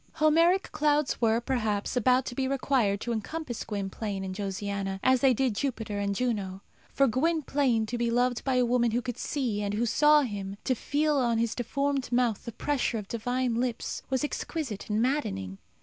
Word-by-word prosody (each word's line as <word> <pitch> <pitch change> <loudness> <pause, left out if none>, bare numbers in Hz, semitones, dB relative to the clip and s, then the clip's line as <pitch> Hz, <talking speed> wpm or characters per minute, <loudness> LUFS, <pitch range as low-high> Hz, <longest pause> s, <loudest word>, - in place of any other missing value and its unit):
Homeric 330 +5 +3
clouds 295 -3 +1
were, 225 0 +3
perhaps, 225 -4 -1
about 250 +2 +3
to - - -5
be 265 +1 -1
required 255 -7 +1
to 240 - -3
encompass 240 +3 -4
Gwynplaine 200 -1 -4
and 190 -1 -4
Josiana, 195 0 -3
as 260 -1 +4
they 270 -2 +5
did 255 -1 +1
Jupiter 225 -4 -3
and 200 0 -1
Juno. 200 -5 -2 0.3
For 275 - +3
Gwynplaine 270 -3 +1
to 240 +2 -4
be 235 0 +1
loved 245 +1 +1
by 265 -2 0
a 250 -1 +3
woman 240 0 +2
who 235 +2 0
could 245 -2 -5
see 245 -8 -1
and 205 0 -2
who 230 +3 +1
saw 300 +6 +5
him, 200 -4 -5
to 260 - +1
feel 295 +4 0
on 240 -3 +2
his 230 0 0
deformed 275 +2 -1
mouth 240 -3 +1
the 235 - -5
pressure 265 -1 -1
of 210 -2 -6
divine 245 +2 -1
lips, 240 0 -2
was 265 +1 0
exquisite 295 -7 -4
and 215 +2 +1
maddening. 95 - -2
240 Hz, 185 wpm, -28 LUFS, 210-270 Hz, 0.3 s, they